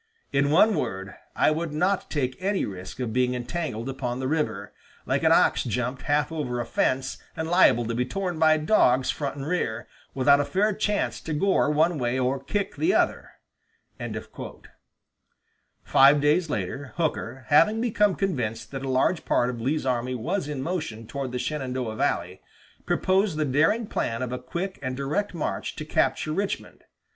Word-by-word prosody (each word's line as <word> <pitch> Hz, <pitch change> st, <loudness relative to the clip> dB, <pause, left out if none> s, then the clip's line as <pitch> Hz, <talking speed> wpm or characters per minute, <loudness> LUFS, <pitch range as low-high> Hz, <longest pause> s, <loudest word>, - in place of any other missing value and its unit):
In 140 Hz, +1 st, +3 dB
one 200 Hz, +8 st, +5 dB
word, 95 Hz, -, -3 dB, 0.2 s
I -, -, +4 dB
would 160 Hz, +1 st, -2 dB
not 185 Hz, +5 st, 0 dB
take 130 Hz, -4 st, -1 dB
any 195 Hz, +1 st, 0 dB
risk 95 Hz, +4 st, -8 dB
of 120 Hz, -4 st, -2 dB
being 125 Hz, 0 st, +1 dB
entangled 125 Hz, -2 st, -4 dB
upon 130 Hz, -2 st, -3 dB
the 130 Hz, -, -2 dB
river, 105 Hz, -9 st, -2 dB, 0.3 s
like -, -, 0 dB
an -, -, +4 dB
ox -, -, +4 dB
jumped 125 Hz, +2 st, -2 dB
half 145 Hz, +3 st, +1 dB
over 135 Hz, -7 st, -3 dB
a 120 Hz, -, -2 dB
fence 130 Hz, +1 st, 0 dB, 0.2 s
and 160 Hz, 0 st, -2 dB
liable 165 Hz, -9 st, +4 dB
to 115 Hz, -, -2 dB
be 120 Hz, +2 st, +1 dB
torn 180 Hz, +3 st, -3 dB
by 155 Hz, -1 st, +5 dB
dogs 145 Hz, -7 st, +3 dB
front 140 Hz, -2 st, -4 dB
and 140 Hz, -1 st, -6 dB
rear, 120 Hz, -9 st, -2 dB, 0.3 s
without 140 Hz, +2 st, +5 dB
a -, -, +2 dB
fair 195 Hz, +9 st, +1 dB
chance 210 Hz, +1 st, -1 dB
to 160 Hz, -, -4 dB
gore 190 Hz, 0 st, +2 dB
one 155 Hz, +2 st, +2 dB
way 120 Hz, +1 st, 0 dB
or 130 Hz, +1 st, 0 dB
kick 200 Hz, +6 st, -2 dB
the 355 Hz, +4 st, +2 dB
other." -, -, +1 dB, 2.5 s
Five 140 Hz, +2 st, +6 dB
days 150 Hz, +4 st, +2 dB
later, 140 Hz, -2 st, -4 dB
Hooker, 135 Hz, -6 st, -2 dB
having 210 Hz, +9 st, +5 dB
become 210 Hz, -4 st, +2 dB
convinced 125 Hz, -, -2 dB
that 135 Hz, -1 st, -5 dB
a 135 Hz, -, -3 dB
large 130 Hz, +6 st, +1 dB
part 120 Hz, +1 st, +1 dB
of 120 Hz, -2 st, -7 dB
Lee's 140 Hz, +4 st, -1 dB
army 125 Hz, 0 st, -1 dB
was 160 Hz, -, -2 dB
in 145 Hz, -3 st, -4 dB
motion 150 Hz, -10 st, -4 dB
toward 135 Hz, +2 st, -4 dB
the 125 Hz, -, -3 dB
Shenandoah 130 Hz, -4 st, -3 dB
valley, -, -, -1 dB, 0.5 s
proposed 190 Hz, -2 st, +1 dB
the 155 Hz, -, +1 dB
daring 160 Hz, -, +2 dB
plan 115 Hz, -, -2 dB
of 125 Hz, -, -4 dB
a 125 Hz, -, -3 dB
quick 170 Hz, +10 st, -5 dB
and 130 Hz, -1 st, -3 dB
direct 155 Hz, +9 st, -2 dB
march 160 Hz, -, -3 dB
to -, -, -6 dB
capture 155 Hz, -, 0 dB
Richmond. 195 Hz, +3 st, -4 dB
140 Hz, 175 wpm, -26 LUFS, 125-170 Hz, 2.5 s, Five